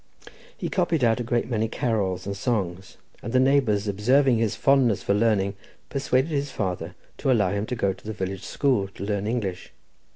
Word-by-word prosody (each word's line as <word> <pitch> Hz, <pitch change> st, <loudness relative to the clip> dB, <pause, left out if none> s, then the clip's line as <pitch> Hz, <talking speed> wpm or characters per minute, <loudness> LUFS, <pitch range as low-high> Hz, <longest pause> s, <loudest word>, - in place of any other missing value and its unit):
He -, -, -3 dB
copied 170 Hz, -6 st, 0 dB
out 115 Hz, 0 st, +3 dB
a -, -, -1 dB
great 120 Hz, 0 st, 0 dB
many 115 Hz, -2 st, 0 dB
carols 105 Hz, -6 st, -1 dB
and 100 Hz, 0 st, -3 dB
songs, 95 Hz, -5 st, -2 dB, 0.2 s
and 115 Hz, -, -5 dB
the 130 Hz, -, +5 dB
neighbours, 130 Hz, -6 st, +3 dB
observing 120 Hz, +5 st, +3 dB
his 115 Hz, -2 st, 0 dB
fondness 135 Hz, -7 st, +3 dB
for -, -, +1 dB
learning, 100 Hz, -2 st, +2 dB, 0.4 s
persuaded 135 Hz, +1 st, 0 dB
his 145 Hz, -1 st, -1 dB
father 90 Hz, -6 st, -3 dB, 0.2 s
to 135 Hz, -, +1 dB
allow 105 Hz, -7 st, +3 dB
him 100 Hz, +1 st, -2 dB
to 125 Hz, -, -2 dB
go 100 Hz, -4 st, 0 dB
to 95 Hz, -, -19 dB
the -, -, -2 dB
village 95 Hz, -2 st, -4 dB
school 125 Hz, -9 st, +1 dB
to 95 Hz, -, -10 dB
learn 100 Hz, 0 st, -1 dB
English. 100 Hz, -6 st, -3 dB
110 Hz, 190 wpm, -25 LUFS, 100-130 Hz, 0.4 s, the